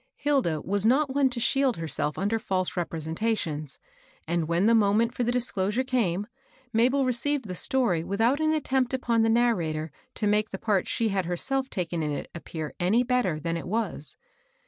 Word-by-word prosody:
Hilda 265 Hz, -, 0 dB
was 200 Hz, +2 st, 0 dB
not 265 Hz, +5 st, +3 dB
one 275 Hz, -1 st, +3 dB
to 245 Hz, -1 st, -3 dB
shield 265 Hz, +1 st, +2 dB
herself 150 Hz, -2 st, -1 dB
under 205 Hz, +4 st, 0 dB
Mae 185 Hz, -1 st, +2 dB
representations, 165 Hz, -2 st, -2 dB, 0.5 s
and 170 Hz, -1 st, 0 dB
when 170 Hz, +4 st, +1 dB
the 230 Hz, -, +5 dB
moment 225 Hz, +2 st, +3 dB
for 245 Hz, -, -1 dB
the 240 Hz, -, +1 dB
dis 245 Hz, 0 st, +1 dB
closure 205 Hz, +6 st, 0 dB
came, 210 Hz, -7 st, 0 dB, 0.5 s
Mabel 255 Hz, +5 st, +3 dB
received 260 Hz, +2 st, 0 dB
the 185 Hz, -, -5 dB
story 180 Hz, -4 st, +1 dB
without 225 Hz, -, +1 dB
an 310 Hz, 0 st, +2 dB
attempt 265 Hz, -4 st, 0 dB
upon 235 Hz, -3 st, +1 dB
the 225 Hz, -, +3 dB
narrator 170 Hz, -10 st, +1 dB, 0.2 s
to 215 Hz, -, -1 dB
make 210 Hz, +1 st, +2 dB
the 195 Hz, -, -5 dB
part 200 Hz, -2 st, 0 dB
she 230 Hz, -1 st, 0 dB
had 195 Hz, -2 st, 0 dB
herself 265 Hz, +10 st, -1 dB
taken 175 Hz, -3 st, -2 dB
in 150 Hz, -1 st, -1 dB
it 145 Hz, -, -5 dB
appear 160 Hz, -2 st, -6 dB
any 205 Hz, +8 st, +3 dB
better 245 Hz, -11 st, 0 dB
than 165 Hz, +2 st, -2 dB
it 165 Hz, -, -5 dB
was. 200 Hz, -8 st, -2 dB
215 Hz, 185 wpm, -27 LUFS, 170-250 Hz, 0.5 s, the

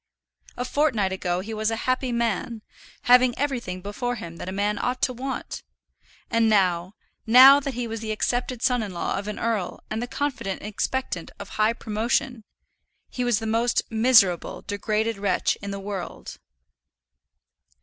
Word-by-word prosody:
A 250 Hz, -, -2 dB
fortnight 255 Hz, -9 st, +1 dB
ago 180 Hz, -1 st, -2 dB
he 220 Hz, +4 st, -6 dB
was 215 Hz, 0 st, 0 dB
a 225 Hz, -, -1 dB
happy 255 Hz, 0 st, 0 dB
man, 230 Hz, -1 st, -2 dB, 0.4 s
having 250 Hz, 0 st, +5 dB
everything 240 Hz, -10 st, -2 dB
before 245 Hz, +5 st, -3 dB
him 170 Hz, -6 st, -8 dB
that 180 Hz, -, -6 dB
a -, -, -4 dB
man 205 Hz, +1 st, -1 dB
ought 250 Hz, +1 st, -1 dB
to 255 Hz, -, +2 dB
want; 260 Hz, +2 st, -5 dB, 0.7 s
and 230 Hz, -1 st, +3 dB
now 185 Hz, -2 st, +2 dB, 0.3 s
now 260 Hz, +5 st, +9 dB
that 275 Hz, -3 st, -5 dB
he 245 Hz, 0 st, -2 dB
was 225 Hz, 0 st, -5 dB
the 220 Hz, 0 st, -4 dB
accepted 245 Hz, +2 st, -2 dB
son 250 Hz, -2 st, +2 dB
in 205 Hz, -4 st, -5 dB
law 170 Hz, -, -2 dB
of 200 Hz, -, -7 dB
an 210 Hz, -, -4 dB
earl, 225 Hz, -5 st, -2 dB
and 220 Hz, +1 st, -2 dB
the 245 Hz, -, -3 dB
confident 260 Hz, -9 st, -3 dB
expectant 210 Hz, -3 st, -3 dB
of 200 Hz, -1 st, -9 dB
high 215 Hz, +1 st, +1 dB
promotion 230 Hz, +2 st, -1 dB, 0.7 s
he 250 Hz, -, -2 dB
was 240 Hz, -3 st, +2 dB
the 225 Hz, -, -4 dB
most 230 Hz, +2 st, +1 dB
miserable, 220 Hz, -6 st, +3 dB
degraded 215 Hz, +1 st, -1 dB
wretch 200 Hz, -, +1 dB
in 200 Hz, -, -5 dB
the 200 Hz, 0 st, -4 dB
world! 195 Hz, -2 st, -7 dB
225 Hz, 165 wpm, -25 LUFS, 200-245 Hz, 0.7 s, now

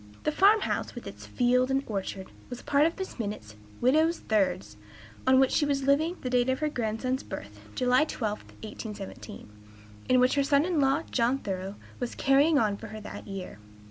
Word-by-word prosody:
The 305 Hz, -, +1 dB
farm 405 Hz, +7 st, +5 dB
house, -, -, -2 dB
with -, -, -8 dB
its -, -, -9 dB
fields 250 Hz, +1 st, +2 dB
and 270 Hz, +1 st, +1 dB
orchard, 195 Hz, -2 st, -4 dB, 0.2 s
was 245 Hz, -1 st, -7 dB
a -, -, -22 dB
part 290 Hz, +2 st, +3 dB
of 330 Hz, -, -4 dB
Mrs. 380 Hz, -8 st, -7 dB
Minott's 205 Hz, -, -5 dB, 0.3 s
"widow's 315 Hz, +7 st, +3 dB
thirds," 185 Hz, -, 0 dB, 0.5 s
on 260 Hz, 0 st, +6 dB
which 265 Hz, -1 st, +4 dB
she -, -, +2 dB
was 280 Hz, -2 st, 0 dB
living 290 Hz, +5 st, +2 dB
at -, -, -18 dB
the 255 Hz, -, -2 dB
date 250 Hz, 0 st, +2 dB
of 260 Hz, -, +1 dB
her 305 Hz, +1 st, -1 dB
grandson's 250 Hz, +1 st, -2 dB
birth 105 Hz, +1 st, -8 dB, 0.2 s
(July 250 Hz, +3 st, +3 dB
12, 215 Hz, -8 st, -3 dB, 0.2 s
1817), 210 Hz, -1 st, -8 dB, 0.6 s
and 255 Hz, -, +5 dB
which 250 Hz, +1 st, +4 dB
her 280 Hz, -, +2 dB
son 280 Hz, +2 st, +3 dB
in 350 Hz, -4 st, 0 dB
law, 275 Hz, +4 st, +2 dB
John 245 Hz, +2 st, +2 dB
Thoreau, 195 Hz, -4 st, -5 dB, 0.2 s
was 245 Hz, -1 st, -4 dB
"carrying 285 Hz, +3 st, +4 dB
on" 210 Hz, -5 st, +1 dB
for 225 Hz, -, -9 dB
her 215 Hz, +1 st, -8 dB
that -, -, -9 dB
year. 195 Hz, -, -7 dB
255 Hz, 200 wpm, -28 LUFS, 215-280 Hz, 0.6 s, on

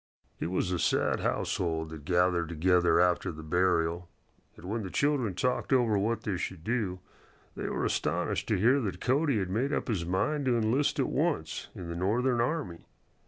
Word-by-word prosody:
It -, -, -2 dB
was 90 Hz, +1 st, -1 dB
a 90 Hz, -, -1 dB
sad -, -, +1 dB
household 80 Hz, -2 st, -1 dB
that 80 Hz, -2 st, -9 dB
gathered 90 Hz, -2 st, +2 dB
together 90 Hz, +2 st, +3 dB
after 90 Hz, 0 st, +2 dB
the 80 Hz, -1 st, -9 dB
burial, 85 Hz, +1 st, +1 dB, 0.5 s
and -, -, -12 dB
when 110 Hz, +4 st, -2 dB
the 95 Hz, -, -5 dB
children 135 Hz, -6 st, 0 dB
talked 125 Hz, +7 st, -1 dB
over 120 Hz, -5 st, +3 dB
what 110 Hz, +2 st, 0 dB
they 100 Hz, -4 st, -1 dB
should 90 Hz, -2 st, -5 dB
do, 105 Hz, -5 st, -2 dB, 0.5 s
they -, -, -4 dB
were -, -, -1 dB
astonished -, -, -1 dB
to -, -, +2 dB
hear 120 Hz, +9 st, +4 dB
that 95 Hz, -6 st, -3 dB
Cody 140 Hz, -, +1 dB
had 95 Hz, -2 st, -2 dB
made 125 Hz, +8 st, 0 dB
up -, -, -1 dB
his 105 Hz, -8 st, -1 dB
mind 115 Hz, -, 0 dB
to 125 Hz, -2 st, +2 dB
enlist 115 Hz, +6 st, +1 dB
at 135 Hz, -, +3 dB
once 145 Hz, -, -1 dB
in 90 Hz, -, -7 dB
the 85 Hz, -, -5 dB
Northern 120 Hz, +7 st, +1 dB
army. 120 Hz, -, -3 dB
95 Hz, 185 wpm, -29 LUFS, 90-125 Hz, 0.5 s, hear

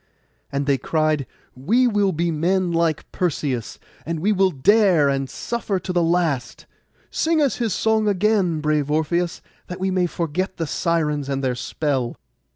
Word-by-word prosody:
And 140 Hz, 0 st, -1 dB
they 140 Hz, -2 st, +2 dB
cried, 155 Hz, -3 st, 0 dB, 0.3 s
'We 220 Hz, -, +2 dB
will 205 Hz, -3 st, +2 dB
be 170 Hz, 0 st, -1 dB
men 175 Hz, +3 st, +1 dB
like 165 Hz, -2 st, 0 dB
Perseus, 140 Hz, -, -2 dB, 0.3 s
and 165 Hz, 0 st, -3 dB
we 200 Hz, +7 st, +1 dB
will 195 Hz, -2 st, +3 dB
dare 180 Hz, 0 st, +4 dB
and 135 Hz, -1 st, -1 dB
suffer 215 Hz, -, -3 dB
to 180 Hz, +1 st, -5 dB
the 175 Hz, -, +2 dB
last. 165 Hz, -8 st, 0 dB, 0.5 s
Sing 320 Hz, 0 st, +1 dB
us 285 Hz, -4 st, +1 dB
his 230 Hz, -3 st, -1 dB
song 220 Hz, -1 st, +1 dB
again, 195 Hz, -5 st, +1 dB
brave 150 Hz, -1 st, 0 dB
Orpheus, 170 Hz, +3 st, 0 dB, 0.2 s
that 180 Hz, -, -7 dB
we 190 Hz, 0 st, 0 dB
may 185 Hz, -1 st, +1 dB
forget 175 Hz, +3 st, -3 dB
the 165 Hz, -, -1 dB
Sirens 150 Hz, -3 st, -1 dB
and 135 Hz, 0 st, -2 dB
their 130 Hz, -1 st, +1 dB
spell. 130 Hz, -1 st, -2 dB
170 Hz, 160 wpm, -22 LUFS, 145-190 Hz, 0.5 s, dare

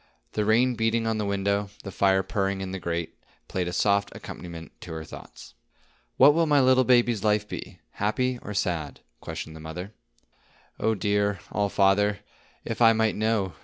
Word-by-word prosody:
The 105 Hz, -, -1 dB
rain 120 Hz, +4 st, +3 dB
beating 115 Hz, 0 st, 0 dB
on 110 Hz, -1 st, 0 dB
the 105 Hz, -, -1 dB
window, 100 Hz, +1 st, 0 dB
the 100 Hz, -, -6 dB
fire 95 Hz, 0 st, +2 dB
purring 100 Hz, -1 st, -1 dB
in 95 Hz, -1 st, -5 dB
the 95 Hz, -, -4 dB
grate, 85 Hz, -1 st, -3 dB, 0.3 s
played 90 Hz, -2 st, -2 dB
a -, -, -2 dB
soft 100 Hz, +2 st, +2 dB
accompaniment 85 Hz, -3 st, -9 dB
to -, -, -7 dB
her 80 Hz, 0 st, -5 dB
thoughts. 70 Hz, -, -12 dB, 0.6 s
"What 140 Hz, +3 st, +8 dB
will 165 Hz, +1 st, +2 dB
my 145 Hz, -1 st, +4 dB
little 130 Hz, -1 st, +5 dB
baby's 120 Hz, -4 st, +3 dB
life 105 Hz, -1 st, +2 dB
be,—happy 120 Hz, -, -3 dB
or 105 Hz, -, -7 dB
sad?" 85 Hz, -7 st, -2 dB, 0.2 s
questioned 80 Hz, -, -7 dB
the -, -, -10 dB
mother. 90 Hz, +6 st, -7 dB, 0.9 s
"Oh, 110 Hz, 0 st, +1 dB
dear 100 Hz, 0 st, +1 dB
All 100 Hz, -1 st, 0 dB
Father, 100 Hz, +1 st, +2 dB, 0.4 s
if 115 Hz, -, -4 dB
I 115 Hz, -1 st, +7 dB
might 110 Hz, -1 st, +1 dB
know!" 110 Hz, -4 st, 0 dB
100 Hz, 170 wpm, -26 LUFS, 95-110 Hz, 0.9 s, What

